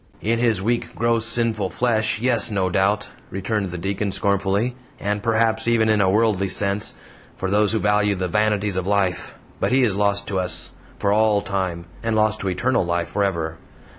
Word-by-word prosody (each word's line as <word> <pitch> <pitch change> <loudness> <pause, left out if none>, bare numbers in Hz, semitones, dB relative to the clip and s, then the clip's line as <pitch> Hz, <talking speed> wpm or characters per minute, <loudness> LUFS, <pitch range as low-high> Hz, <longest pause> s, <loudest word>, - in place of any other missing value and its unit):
"In 115 +2 +1
his 115 -5 +1
weak, 120 +2 -1
gross, 115 -1 +1
sinful 115 -4 -1
flesh 110 +2 0
yes, 120 0 +1
no 95 -3 0
doubt," 100 +3 +1 0.2
returned 100 +1 -2
the 90 - -5
Deacon, 100 +3 -2
scornfully, 100 +5 0 0.2
"and, 105 0 -1
perhaps, 115 0 +1
even 115 -2 +3
in 105 -1 +3
a 95 - +3
worldly 105 -1 +2
sense, 100 +2 -1 0.4
for 95 0 -2
those 105 0 +3
who - - +2
value 105 -1 +2
the 90 -1 -2
vanities 105 0 +1
of 95 0 -2
life; 100 -3 0 0.2
but - - 0
he 130 0 +4
is 105 -6 +2
lost 100 0 +1
to 95 -2 0
us, 90 0 -5 0.3
for 100 - +1
all 105 -1 +3
time, 95 -4 -2 0.2
and 115 -1 -1
lost 110 0 +2
to 100 - -3
eternal 120 +6 +1
life 85 -1 -1
forever. 85 -5 -1
105 Hz, 185 wpm, -22 LUFS, 95-110 Hz, 0.4 s, he